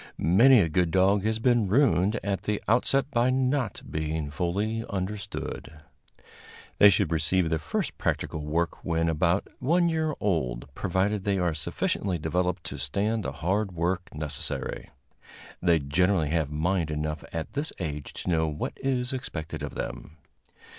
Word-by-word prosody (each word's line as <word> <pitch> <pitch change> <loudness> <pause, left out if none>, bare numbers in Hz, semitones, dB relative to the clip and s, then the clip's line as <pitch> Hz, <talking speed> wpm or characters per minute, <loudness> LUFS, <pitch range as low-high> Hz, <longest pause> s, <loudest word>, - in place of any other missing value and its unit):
Many 115 - +6
a 85 - +2
good 85 +2 +1
dog 95 +3 +3
has 110 0 +1
been 120 -2 +2
ruined 110 -2 +3
at 100 -1 -1
the 105 -1 0
outset 135 +5 +2
by 120 0 +3
not 130 -3 0
being 80 -1 -3
fully 100 +8 -1
understood. 100 -4 -5 1.0
They 105 - +9
should 100 -3 +2
receive 80 +2 +1
their 80 - +1
first 80 +1 -2
practical - - -1
work 80 +3 -2
when 85 0 0
about 85 +4 +1
one 170 +6 +3
year 160 -2 0
old, 65 -9 -1
provided 95 +3 0
they 100 -1 +1
are 90 -3 +1
sufficiently 85 +4 -1
developed 90 +3 -1
to 70 - -6
stand 100 - 0
the 70 - -3
hard 95 +8 -1
work 90 +3 -1
necessary. 75 -1 -4 0.7
They 85 -2 +4
generally 80 +3 +1
have 80 -2 0
mind 80 +2 0
enough 75 0 -3
at 80 -1 -5
this 145 +3 -2
age 75 -5 -4
to - - -5
know 80 -1 +2
what 75 0 -3
is 130 -1 -1
expected 90 - -5
of - - -5
them. 80 - -6
90 Hz, 155 wpm, -27 LUFS, 80-105 Hz, 1.0 s, They